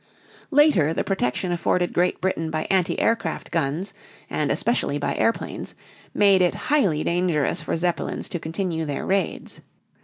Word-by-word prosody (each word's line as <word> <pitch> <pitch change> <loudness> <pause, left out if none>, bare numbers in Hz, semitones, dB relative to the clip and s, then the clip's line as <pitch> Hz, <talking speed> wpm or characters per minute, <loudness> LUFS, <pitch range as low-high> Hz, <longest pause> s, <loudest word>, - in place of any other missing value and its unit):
Later 270 - +4
the - - 0
protection 180 -1 -1
afforded 175 +1 0
Great 180 +1 +1
Britain 165 -4 -1
by 155 0 -2
anti 185 -2 +1
aircraft 230 0 -1
guns 165 +3 -1 0.4
and - - 0
especially 190 -11 0
by 145 - -1
airplanes, 230 - -1 0.4
made 200 -2 +4
it 180 - +2 0.2
highly 185 - +3
dangerous 170 -2 0
for 155 - -2
Zeppelins 175 +1 -2
to 175 - -4
continue 165 0 -3
their 145 -2 -3
raids. 195 0 -2
175 Hz, 145 wpm, -24 LUFS, 160-190 Hz, 0.4 s, Later